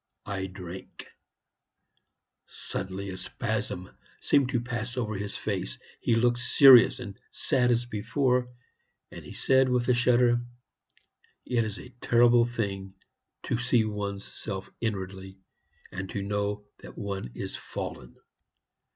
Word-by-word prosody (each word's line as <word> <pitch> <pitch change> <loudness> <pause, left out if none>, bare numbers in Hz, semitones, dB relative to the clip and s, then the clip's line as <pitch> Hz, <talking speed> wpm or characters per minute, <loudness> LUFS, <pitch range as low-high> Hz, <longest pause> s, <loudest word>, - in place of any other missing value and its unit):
I 95 -2 -3
drank." 95 -1 -9 1.4
Suddenly 95 +1 -5
a 95 - -6
spasm 90 0 -3 0.3
seemed 140 -3 +3
to 120 - +1
pass 120 0 -4
over 110 -3 -1
his 100 0 -4
face, - - -3 0.2
he 115 - +2
looked 120 +1 +3
serious 125 -1 +7
and 105 -6 -8
sad 125 -2 +1
as 120 0 +2
before, 125 +3 0 0.6
and - - -9
he - - -11
said, 130 -1 +3
with 125 -1 +1
a - - +6
shudder, 120 0 +4 1.0
"It's 115 -4 0
a 125 - -10
terrible 120 0 +5
thing 100 -5 -4 0.5
to 115 - -1
see 125 -2 +3
one's 100 -2 -4
self 95 -3 -6
inwardly, 95 -3 -4 0.5
and 95 0 -5
to 100 - -3
know 105 0 -2
that - - -12
one 100 - -4
is - - -5
fallen." 60 - -7
110 Hz, 125 wpm, -28 LUFS, 100-120 Hz, 1.4 s, serious